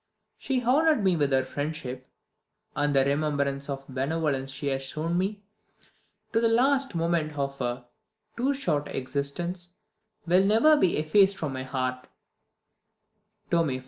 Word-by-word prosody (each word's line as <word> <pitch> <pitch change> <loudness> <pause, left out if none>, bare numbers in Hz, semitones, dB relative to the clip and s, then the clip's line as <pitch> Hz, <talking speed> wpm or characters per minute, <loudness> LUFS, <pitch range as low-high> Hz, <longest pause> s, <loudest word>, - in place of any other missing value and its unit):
She 260 -2 -1
honoured 290 0 +3
me 190 -2 +3
with 145 -3 +1
her 130 -1 +3
friendship, 130 -2 -5 0.7
and 145 -1 +1
the 135 -1 +4
remembrance 140 -1 -1
of 135 -1 -5
the 135 - -13
benevolence 135 0 -1
she 135 +2 -6
has 135 0 -1
shown 155 +5 -3
me, 200 +3 -1 0.9
to 225 - +3
the 230 - +4
last 265 +2 +2
moment 165 -2 0
of 140 0 -3
her 125 0 -3 0.5
too 255 +4 +1
short 150 - -1
existence, 170 +7 -3 0.5
will 180 +2 +4
never 225 +10 +5
be 190 - +2
effaced 190 +6 +3
from 150 -4 -3
my 130 - -4
heart" 130 -1 -3 1.4
(tome 165 -3 +3
i. 130 -1 -3
155 Hz, 145 wpm, -27 LUFS, 135-190 Hz, 1.4 s, never